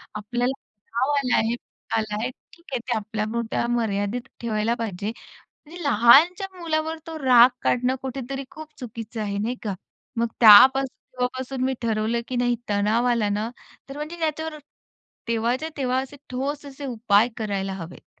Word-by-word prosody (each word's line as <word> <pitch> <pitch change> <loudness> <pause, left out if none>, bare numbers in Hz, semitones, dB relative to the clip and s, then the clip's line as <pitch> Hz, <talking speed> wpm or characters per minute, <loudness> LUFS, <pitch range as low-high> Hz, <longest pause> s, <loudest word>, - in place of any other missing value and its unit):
आपल्याला 240 +5 -1
तणाव 230 +6 -3
आला 255 -3 +2
आहे. 225 +2 +1
तणाव 225 - -5
आला 215 -1 -3
आहे 245 - -1 0.2
ठीक 340 0 -19
आहे. 255 - 0
ते 240 0 -2
आपल्यापुरता 220 +2 -2
मर्यादित 210 0 -1 0.2
ठेवायला 225 0 0
पाहिजे. 205 -2 -3 0.6
म्हणजे 345 +3 -9
लहानच्या 285 - +6
मुलावर 320 -1 -1
तो 320 -1 -6
राग 245 -1 +8
काढणं 250 +1 +2
कुठेतरी 270 +1 -5
खूप 315 0 -10
चुकीचं 230 -2 -7
आहे. 200 -1 -2
नाही 235 +4 -2
का? 205 -3 -2 0.4
मग 235 0 +1
त्यापासून 255 +5 +8 0.2
तेव्हापासून 255 +1 -3
मी 265 0 +1
ठरवलं 225 +1 0
की 255 - -3
नाही 245 0 +2
तणाव 210 +4 +2
आला 230 -3 +1
ना, 210 +3 -1 0.4
तर 275 - -8
म्हणजे 305 +3 -6
त्याच्यावर 315 0 -2 0.7
तेव्हाच्या 235 +6 0
तेव्हा 255 -2 0
असे 275 +2 -10
ठोस 280 +3 -3
असे 280 +1 -8
उपाय 225 -3 +3
करायला 200 -3 -2
हवेत. 175 -2 -11
240 Hz, 155 wpm, -24 LUFS, 220-270 Hz, 0.7 s, राग